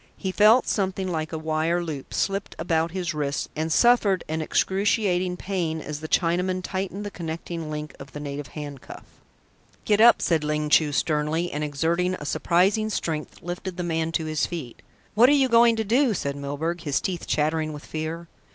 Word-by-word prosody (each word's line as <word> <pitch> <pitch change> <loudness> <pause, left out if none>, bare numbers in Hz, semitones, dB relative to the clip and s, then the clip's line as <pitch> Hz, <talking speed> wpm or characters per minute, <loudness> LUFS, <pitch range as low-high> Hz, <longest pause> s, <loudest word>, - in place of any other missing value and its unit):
He 190 - -3
felt 215 +6 +5
something 190 -2 -1
like 160 -3 -3
a 160 - -3
wire 160 +2 0
loop 150 -5 -6
slipped 195 0 -2
about 165 0 0
his 175 -1 -3
wrists, 145 -2 -2
and 160 +1 -2
suffered 210 -2 +4
an 160 +1 -2
excruciating 190 0 +1
pain 175 -5 -2
as 150 -1 -6
the 155 - -6
Chinaman 180 +2 +1
tightened 195 +2 -4
the 205 - -5
connecting 165 -2 -5
link 150 -1 -5
of 135 0 -10
the 150 - -7
native 145 -1 -5
handcuff. 145 -3 -8 0.8
"Get 210 0 +3
up," 235 +1 +7
said 160 -3 +1
Ling 150 0 -1
Chu 150 0 +4
sternly, 155 +3 0
and, 150 +1 -3
exerting 165 +5 0
a 150 - -8
surprising 195 +8 +2
strength, 160 -6 -4
lifted 175 +1 -5
the 180 - -2
man 165 -1 -1
to 160 - 0
his 155 -1 0
feet. 155 -9 -7 0.3
"What 235 +4 +6
are - - +5
you 275 -2 +4
going 235 -1 +5
to 220 - -1
do?" 235 +2 +2
said 140 -4 -2
Milburgh, 145 +5 -3
his 145 -4 0
teeth 180 -3 -4
chattering 155 +1 0
with 150 -1 -9
fear. 160 +2 -5
165 Hz, 185 wpm, -25 LUFS, 155-190 Hz, 0.8 s, up